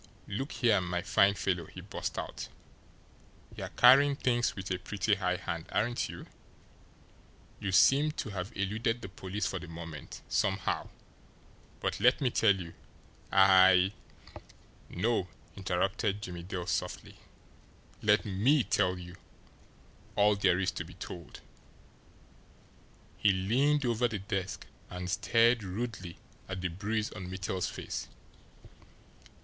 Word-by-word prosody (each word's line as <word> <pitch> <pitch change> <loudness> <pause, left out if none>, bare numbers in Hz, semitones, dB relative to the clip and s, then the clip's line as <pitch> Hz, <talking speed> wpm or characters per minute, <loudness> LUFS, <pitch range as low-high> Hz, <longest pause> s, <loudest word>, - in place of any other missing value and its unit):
"Look 135 +9 -4
here, 110 -6 +3
my 90 0 -2
fine 100 0 +4
fellow," 90 -4 -1
he - - -11
burst - - -5
out, - - -5 1.1
"you're - - -5
carrying 140 +3 +6
things 120 -3 +1
with 95 -1 -6
a 90 - 0
pretty 105 +2 -1
high 90 -3 +1
hand, 85 -3 -5
aren't 120 +3 0
you? - - -8 1.3
You 95 - -2
seem 140 +10 +5
to 120 - -4
have 95 +2 -4
eluded 110 +4 -1
the 100 - -6
police 95 +2 -4
for 95 -1 -2
the 90 - -9
moment, 80 -3 -9
somehow, 95 -1 0 0.9
but - - -1
let 125 +5 +4
me 130 -4 +1
tell 105 -3 +4
you 85 -3 -7 0.6
I 95 0 +6 0.5
" - - -26 0.2
"No," 115 -6 +1 0.3
interrupted 100 +2 -1
Jimmie 90 -2 -6
Dale 90 0 -5
softly, - - -3 0.8
"let - - +3
ME 120 +9 +3
tell 90 -4 +1
you 90 0 -10 1.0
all 105 0 +4
there 100 -3 +3
is 95 0 0
to - - -5
be - - -13
told." 85 -4 -9 1.8
He 105 - +5
leaned 130 +10 +2
over 120 0 +2
the 110 - -4
desk 95 -2 -4 0.2
and 90 0 -5
stared 115 +3 +3
rudely 95 -2 -5 0.3
at 95 -1 -4
the 90 - -1
bruise 105 +5 -2
on 90 -1 -7
Mittel's 95 0 -2
face. - - -5
100 Hz, 130 wpm, -31 LUFS, 90-115 Hz, 1.8 s, carrying